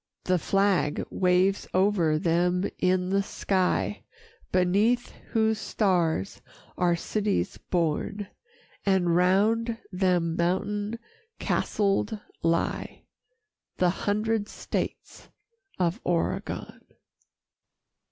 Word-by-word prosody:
The 185 -1 +2
flag 195 -4 +1
waves 185 +2 +2
o'er 185 -5 +3
them 180 +2 +1
in 185 0 +1
the 195 0 +3
sky 195 +1 0 0.5
Beneath 200 +7 +2 0.2
whose 220 -1 +2
stars 180 - 0 0.3
are 175 -1 +2
cities 205 +4 -1
born, 175 +4 -1 0.6
And 185 -4 +2
round 215 +6 +2
them 180 -3 +1
mountain 205 +5 -1 0.4
castled 205 +1 0 0.2
lie 165 0 -1 0.7
The 180 -1 +3
hundred 210 +2 -1
states - - -5 0.5
of 180 +4 0
Oregon. 170 -2 -2
185 Hz, 85 wpm, -27 LUFS, 175-205 Hz, 0.7 s, o'er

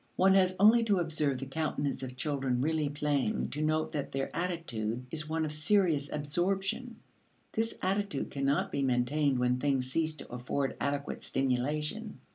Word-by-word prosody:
One 190 +1 +5
has 185 -1 +4
only 220 +3 +7
to 205 -3 +3
observe 155 -5 +1
the 135 - -5
countenance 145 0 -2
of 130 -1 -6
children 135 -3 -1
really 155 +1 +1
playing 150 +7 0
to 150 - -4
note 155 0 +1
that 145 -3 -3
their 135 0 -3
attitude 125 -10 -2
is 155 -1 -2
one 160 0 0
of 150 - -4
serious 155 -3 +2
absorption; 195 - -1 0.6
this 225 +1 -1
attitude 195 -5 -1
cannot 140 +1 0
be 140 - -1
maintained 135 +2 +2
when 125 0 +1
things 130 -2 0
cease 160 +1 0
to 150 - -8
afford 135 +3 -2
adequate 140 0 -2
stimulation. 150 - -1
150 Hz, 160 wpm, -31 LUFS, 135-175 Hz, 0.6 s, only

